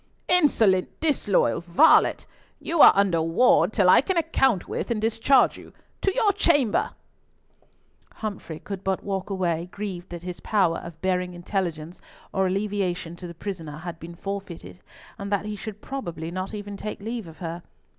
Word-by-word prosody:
"Insolent, 225 Hz, -, +3 dB
disloyal 205 Hz, -, +1 dB
varlet! 175 Hz, -, +4 dB, 0.3 s
You 330 Hz, -1 st, +1 dB
are -, -, +11 dB
under 190 Hz, -4 st, +2 dB
ward 170 Hz, +2 st, +3 dB
till 200 Hz, -5 st, +2 dB
I 180 Hz, -, +7 dB
can 365 Hz, +6 st, -1 dB
account 270 Hz, -, +1 dB
with -, -, -4 dB
and 235 Hz, -2 st, 0 dB
discharge 230 Hz, +4 st, +3 dB
you. -, -, -14 dB, 0.3 s
To 390 Hz, -, +2 dB
your 440 Hz, -5 st, +3 dB
chamber!" 290 Hz, -, +2 dB, 1.3 s
Humfrey 200 Hz, -7 st, -6 dB
could 195 Hz, +3 st, -7 dB
but 190 Hz, -1 st, -1 dB
walk 195 Hz, 0 st, -3 dB
away, 175 Hz, -3 st, -1 dB
grieved 190 Hz, -4 st, -6 dB
that 175 Hz, -1 st, -8 dB
his 180 Hz, -1 st, -6 dB
power 190 Hz, -6 st, +1 dB
of 170 Hz, -2 st, -10 dB
bearing 180 Hz, -1 st, 0 dB
intelligence 175 Hz, -2 st, -4 dB, 0.3 s
or 190 Hz, -1 st, +2 dB
alleviation 185 Hz, -3 st, -2 dB
to 180 Hz, -, -8 dB
the 170 Hz, -, -10 dB
prisoner 165 Hz, -5 st, -6 dB
had 165 Hz, +1 st, -7 dB
been 170 Hz, +1 st, -9 dB
forfeited, 195 Hz, -2 st, -7 dB, 0.4 s
and 200 Hz, 0 st, -5 dB
that 205 Hz, 0 st, 0 dB
he 210 Hz, 0 st, -4 dB
should 210 Hz, 0 st, -8 dB
probably 170 Hz, -12 st, -5 dB
not 185 Hz, +1 st, -4 dB
even 205 Hz, -1 st, -6 dB
take 210 Hz, -, -6 dB
leave 225 Hz, -1 st, -5 dB
of 160 Hz, -, -12 dB
her. 170 Hz, -1 st, -5 dB
195 Hz, 165 wpm, -25 LUFS, 175-215 Hz, 1.3 s, are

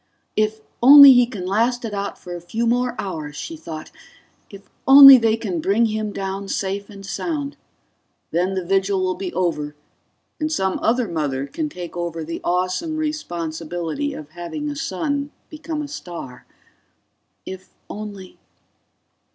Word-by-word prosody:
If 215 Hz, 0 st, 0 dB, 0.2 s
only 280 Hz, +2 st, +10 dB
he 245 Hz, -1 st, +4 dB
can 200 Hz, -7 st, -7 dB
last 235 Hz, +5 st, 0 dB
it 215 Hz, -, -5 dB
out 200 Hz, 0 st, -4 dB
for 175 Hz, -, -9 dB
a 175 Hz, -, -8 dB
few 220 Hz, +7 st, -3 dB
more 245 Hz, +1 st, +1 dB
hours, 155 Hz, -6 st, -5 dB
she 325 Hz, -, -6 dB
thought. 160 Hz, -, -9 dB, 0.6 s
If 200 Hz, -1 st, -13 dB, 0.2 s
only 275 Hz, 0 st, +11 dB
they 225 Hz, -1 st, +2 dB
can 190 Hz, -8 st, -3 dB
bring 205 Hz, +7 st, +2 dB
him 215 Hz, -1 st, -2 dB
down 195 Hz, 0 st, -5 dB
safe 200 Hz, +1 st, -3 dB
and 200 Hz, -1 st, -11 dB
sound. 285 Hz, -, -4 dB, 0.8 s
Then 180 Hz, +3 st, 0 dB
the 185 Hz, -2 st, -3 dB
vigil 195 Hz, +1 st, +1 dB
will 185 Hz, 0 st, 0 dB
be 185 Hz, -1 st, -5 dB
over, 150 Hz, -5 st, -2 dB, 0.6 s
and 310 Hz, 0 st, -2 dB
some 190 Hz, -10 st, -1 dB
other 235 Hz, +1 st, +1 dB
mother 145 Hz, -6 st, -2 dB
can 305 Hz, -, -4 dB
take 180 Hz, -, -8 dB
over 170 Hz, -2 st, -4 dB
the 165 Hz, +2 st, -6 dB
awesome 185 Hz, -, -1 dB
responsibility 175 Hz, -, -4 dB
of 150 Hz, -1 st, -9 dB
having 175 Hz, -, -5 dB
a -, -, -6 dB
son 280 Hz, +4 st, -3 dB, 0.2 s
become 310 Hz, 0 st, -5 dB
a -, -, -6 dB
star 170 Hz, -, -9 dB, 1.0 s
If 185 Hz, 0 st, -9 dB, 0.2 s
only 205 Hz, -3 st, -9 dB
200 Hz, 150 wpm, -21 LUFS, 175-250 Hz, 1.0 s, only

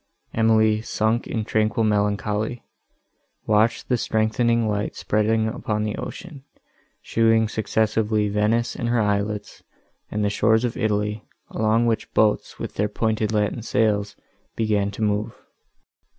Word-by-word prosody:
Emily, 110 Hz, -1 st, +3 dB
sunk 110 Hz, +1 st, -1 dB
in 110 Hz, -2 st, -3 dB
tranquil 110 Hz, 0 st, +1 dB
melancholy, 105 Hz, +2 st, 0 dB, 0.8 s
watched 110 Hz, +2 st, +2 dB
the 125 Hz, -, +2 dB
strengthening 115 Hz, +1 st, +1 dB
light 105 Hz, -1 st, -2 dB
spreading 110 Hz, +1 st, +1 dB
upon 105 Hz, -1 st, -2 dB
the 105 Hz, -1 st, -2 dB
ocean, 155 Hz, -7 st, -8 dB, 0.6 s
showing 115 Hz, -1 st, +3 dB
successively 110 Hz, -1 st, 0 dB
Venice 105 Hz, +3 st, 0 dB
and 120 Hz, -, -2 dB
her 120 Hz, 0 st, +2 dB
islets, 105 Hz, 0 st, -1 dB, 0.5 s
and 105 Hz, 0 st, -1 dB
the -, -, +2 dB
shores 110 Hz, +3 st, +2 dB
of 120 Hz, -, -3 dB
Italy, 105 Hz, -2 st, -1 dB, 0.3 s
along 110 Hz, +2 st, +2 dB
which 115 Hz, -1 st, -1 dB
boats, 105 Hz, -1 st, +2 dB
with -, -, -6 dB
their 105 Hz, +1 st, 0 dB
pointed 110 Hz, 0 st, -1 dB
latin 105 Hz, +2 st, 0 dB
sails, 105 Hz, -2 st, 0 dB, 0.4 s
began 105 Hz, -3 st, +1 dB
to 100 Hz, +2 st, -5 dB
move. 105 Hz, +1 st, -1 dB
110 Hz, 130 wpm, -23 LUFS, 105-115 Hz, 0.8 s, Emily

